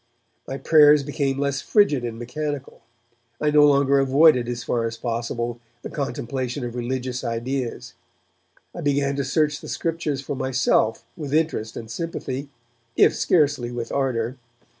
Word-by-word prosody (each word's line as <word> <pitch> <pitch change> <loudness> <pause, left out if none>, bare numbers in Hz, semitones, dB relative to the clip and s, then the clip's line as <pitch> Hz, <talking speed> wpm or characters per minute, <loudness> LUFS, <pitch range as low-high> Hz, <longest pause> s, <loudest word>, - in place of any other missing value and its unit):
My 135 - -4
prayers 150 -1 +6
became 140 -1 -1
less 140 0 -1
frigid 175 - +3
and 115 -1 -4
mechanical; 140 +3 -5 0.6
I 150 - +1
no 150 0 +6
longer 140 -1 +4
avoided 135 -2 +4
as 120 0 -4
far 115 -1 -1
as 115 0 -6
possible 120 0 -3 0.2
the - - -6
contemplation 130 +1 -3
of 120 - -5
religious 125 +1 -3
ideas; 120 +2 -3 0.8
I - - -6
began 140 -1 +1
to 140 - 0
search 150 +2 0
the - - -9
Scriptures 165 -4 -2
for 140 +1 -4
myself 125 -4 +1
with 150 -4 -3
interest 155 -9 -1
and 115 - -7
sympathy, 140 -1 -4 0.5
if - - +5
scarcely 145 -7 +2
with 120 -1 -5
ardour. 130 -2 -1
135 Hz, 145 wpm, -23 LUFS, 120-145 Hz, 0.8 s, prayers